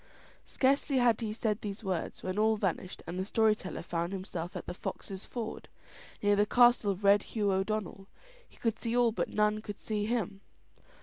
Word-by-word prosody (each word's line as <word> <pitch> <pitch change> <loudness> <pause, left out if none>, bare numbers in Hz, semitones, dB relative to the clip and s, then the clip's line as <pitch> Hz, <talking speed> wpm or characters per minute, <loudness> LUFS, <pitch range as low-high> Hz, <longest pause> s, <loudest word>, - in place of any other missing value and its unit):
Scarcely 275 +1 +2
had 240 -2 +3
he 220 -2 -2
said 215 -1 -1
these 205 +1 -5
words 185 -4 -3
when 185 +2 -2
all 220 0 +3
vanished, 185 -2 -2
and 180 - -4
the - - 0
story 220 +2 +3
teller 190 - -7
found 170 +2 -2
himself 185 -2 -5
at - - -5
the - - -5
Foxes' 190 +1 -6
Ford, 225 -3 -5 0.6
near 205 0 +4
the 205 +1 +3
castle 240 -3 +5
of 195 +1 -2
Red 200 +1 +6
Hugh 205 -2 -1
O'Donnell. 195 0 -2 0.4
He - - -22
could 225 -2 -1
see 235 0 -1
all 240 -2 +4
but - - -2
none 210 0 +1
could 205 -2 -7
see 210 -1 -2
him. 210 -4 -2
210 Hz, 190 wpm, -31 LUFS, 195-225 Hz, 0.6 s, Red